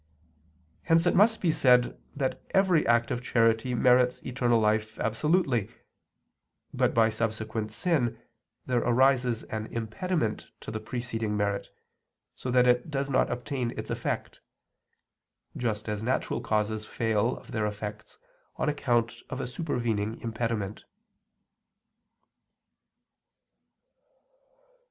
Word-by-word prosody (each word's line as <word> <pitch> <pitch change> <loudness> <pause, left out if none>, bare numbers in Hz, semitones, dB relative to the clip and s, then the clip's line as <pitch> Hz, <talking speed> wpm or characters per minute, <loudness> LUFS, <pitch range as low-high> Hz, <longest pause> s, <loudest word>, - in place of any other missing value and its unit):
Hence 165 +1 +3
it 175 - +3
must 220 +3 +4
be 170 - +3
said 125 -4 +4 0.2
that 135 -2 -2
every 185 -5 +4
act 120 0 +3
of 120 - -1
charity 115 0 +2
merits 125 0 +4
eternal 120 -2 +2
life 110 0 +1
absolutely; 125 - +1 1.0
but - - +1
by 115 -1 +5
subsequent 110 -1 -3
sin, 130 -3 0 0.5
there 125 -1 +1
arises 125 -1 +2
an 110 0 -5
impediment 115 +3 -2
to - - -7
the 110 - -3
preceding 115 -2 -3
merit, 100 -1 -1 0.6
so 125 - -6
that 125 0 +4
it 125 +6 +3
does 140 -1 -2
not 130 - +2
obtain 125 0 -3
its - - -5
effect; - - -3 1.2
just 110 -3 -2
as 105 -1 -2
natural 125 +3 -1
causes 110 0 -1
fail 115 +1 0
of - - -13
their 110 -2 0
effects 105 +1 -7 0.4
on - - -1
account 120 -5 0
of 130 - -4
a - - -2
supervening 120 -6 -2
impediment. 110 -3 -3
120 Hz, 115 wpm, -28 LUFS, 110-130 Hz, 1.2 s, by